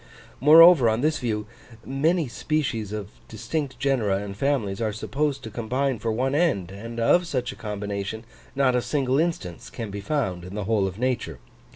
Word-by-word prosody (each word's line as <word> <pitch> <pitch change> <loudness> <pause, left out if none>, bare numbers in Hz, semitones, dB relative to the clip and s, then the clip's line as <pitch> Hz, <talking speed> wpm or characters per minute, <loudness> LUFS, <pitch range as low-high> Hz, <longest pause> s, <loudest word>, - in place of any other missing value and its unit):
Moreover, 155 -2 +8
on 110 +2 0
this 155 +1 +1
view, 105 -3 -2 0.4
many 155 +4 +1
species 115 -4 -2
of 105 -1 -5 0.2
distinct 135 +4 -4
genera 120 -7 +1
and 100 0 -6
families 115 -5 -1
are 110 -2 0
supposed 135 +5 -2
to 110 - -7
combine 125 +2 -1
for 115 +1 -1
one 130 +4 0
end; 140 - +1
and 115 +4 -7
of 175 +10 +3
such 125 -5 -2
a - - -10
combination, 105 0 -4 0.3
not 135 -2 +3
a 125 - +2
single 135 0 0
instance 160 - -3
can 115 -3 -6
be 100 0 -5
found 100 - -2
in 90 +3 -8
the 105 - -3
whole 100 -1 +1
of 95 0 -6
nature. 120 - -2
120 Hz, 180 wpm, -25 LUFS, 105-140 Hz, 0.4 s, Moreover